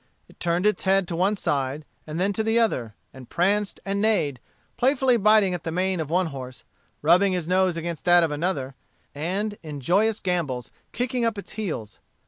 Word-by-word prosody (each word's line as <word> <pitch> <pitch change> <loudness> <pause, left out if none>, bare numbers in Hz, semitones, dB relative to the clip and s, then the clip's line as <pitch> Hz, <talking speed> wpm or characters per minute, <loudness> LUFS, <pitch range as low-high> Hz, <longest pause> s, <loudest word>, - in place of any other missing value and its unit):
It - - -21
turned 175 +2 0
its 210 - +2
head 195 -1 +3
to 170 - -3
one 195 +4 +1
side, 140 -2 -2 0.2
and 155 +2 -4
then 195 +2 +1
to 220 - -1
the 225 +1 +1
other, 125 - 0 0.2
and 130 -2 -12
pranced 200 +3 0
and 200 0 -1
neighed, 160 - +1 0.4
playfully 260 -1 +3
biting 210 -3 +4
at 175 - -4
the 165 - -3
mane 185 +1 0
of 155 -3 -3
one 180 +3 +2
horse, 130 -2 -8 0.4
rubbing 180 +5 +4
his 175 -3 -2
nose 185 -1 +2
against 165 -1 -4
that 175 -1 +6
of 160 - 0
another, 145 -4 -2 0.4
and 195 +8 -3
in 150 -3 -7
joyous 205 - +2
gambols 150 -10 -2 0.2
kicking 245 0 -2
up 230 -2 0
its 200 - -8
heels. 160 - -5
180 Hz, 190 wpm, -24 LUFS, 155-205 Hz, 0.4 s, that